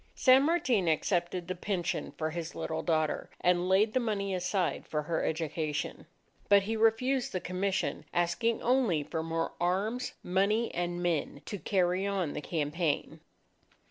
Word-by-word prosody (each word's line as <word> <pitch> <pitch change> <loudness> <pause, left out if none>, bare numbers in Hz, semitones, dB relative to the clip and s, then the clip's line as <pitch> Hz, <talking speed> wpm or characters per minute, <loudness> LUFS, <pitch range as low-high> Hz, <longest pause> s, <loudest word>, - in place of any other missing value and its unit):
San 260 0 +6
Martin 270 - +2
accepted 175 +2 0
the 185 - -1
pension 180 -1 -2
for 155 0 -1
his 170 0 -5
little 160 - -3
daughter, 155 -2 0
and 180 0 +2
laid 210 +3 +4
the 255 - +3
money 200 -5 -1
aside 180 0 -1
for 150 -1 -2
her 160 +2 -1
education. 155 -1 -2 0.4
But 200 -1 +6
he 220 +3 -2
refused 235 +4 +2
the 185 - 0
commission, 185 +2 -2
asking 175 +7 0
only 235 - +2
for 160 +2 -3
more 165 0 -2
arms, 205 +8 0
money, 200 +5 +1
and 175 0 -2
men, 155 -4 -1
to 205 - -5
carry 185 +2 +1
on 190 -7 -1
the - - -4
campaign. 155 0 -1
180 Hz, 150 wpm, -30 LUFS, 165-210 Hz, 0.4 s, San